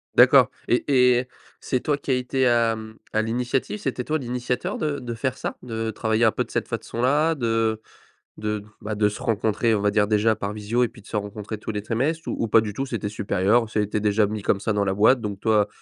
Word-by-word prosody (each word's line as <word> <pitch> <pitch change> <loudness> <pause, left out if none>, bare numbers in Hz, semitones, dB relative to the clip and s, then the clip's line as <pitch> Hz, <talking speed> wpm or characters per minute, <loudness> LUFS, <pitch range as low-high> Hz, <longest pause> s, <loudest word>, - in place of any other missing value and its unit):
D'accord, - - +7 0.2
et 120 - +2 0.3
et 125 - -2 0.3
c'est 130 - -1
toi 145 +2 0
qui 140 - -4
a - - +4
été 130 +1 0
à, 115 -1 +3
mmh, 110 0 -10 0.2
à 110 - +2
l'initiative, 125 - -2
c'était 130 -5 -3
toi 155 +4 -1
l'initiateur 125 0 -3
de 150 -2 -2
de 120 -1 -5
faire 130 +3 -2
ça? - - -4
De 115 -2 -3
travailler 110 +1 0
un 110 - +5
peu - - -1
de - - -15
cette - - -1
façon-là 145 +7 +1
de 115 -3 0 0.6
de, 105 -1 -3 0.2
bah, 105 0 -3
de 105 0 +2
se 105 - -7
rencontrer, 110 0 +1
on 105 - 0
va 105 - +2
dire 105 0 +2
déjà 110 +1 +3
par 100 0 -4
visio, 110 +4 -1
et - - -1
puis - - -16
de 105 - -20
se - - -4
rencontrer 105 +1 -4
tous 110 - -6
les 105 -1 -2
trimestres? 140 +9 -1
Ou - - -2
ou 115 - 0
pas 110 - +6
du 105 -2 -4
tout 135 +6 -3
c'est 115 -3 -3
tes 105 - -3
supérieurs? 105 +2 +1
Ça - - -2
a 105 - +3
été 105 +1 -2
déjà 105 0 +2
mis 105 0 -4
comme 100 - +1
ça 105 +2 -1
dans 100 -1 +1
la 95 0 0
boîte, 115 +5 +4
donc 105 -3 -4
toi, 105 -1 +2
110 Hz, 250 wpm, -24 LUFS, 105-125 Hz, 0.6 s, D'accord